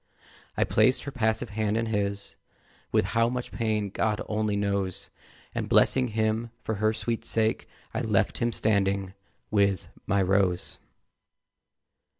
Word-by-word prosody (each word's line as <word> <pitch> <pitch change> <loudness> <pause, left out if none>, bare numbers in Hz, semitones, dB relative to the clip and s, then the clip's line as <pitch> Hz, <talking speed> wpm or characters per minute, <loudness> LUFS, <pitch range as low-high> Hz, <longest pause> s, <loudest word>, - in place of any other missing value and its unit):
I - - +4
placed 130 - +3
her 140 - -5
passive 110 -4 0
hand 110 0 0
in 115 - 0
his 100 -2 -2 0.6
With - - +3
how 115 0 +3
much 125 0 -4
pain 110 -3 -1
God 105 +1 0
only 105 -1 0
knows 100 -2 -1 0.4
And - - -3
blessing 130 -1 +4
him 110 +1 0
for 110 - -1
her 110 0 +4
sweet 115 +1 -3
sake, 110 0 +1 0.3
I - - -1
left - - +1
him 120 0 +1
standing 100 -3 +1 0.4
with 100 -3 +2 0.2
my 100 -2 +3
Rose! 95 -1 +1
110 Hz, 140 wpm, -27 LUFS, 100-115 Hz, 0.6 s, I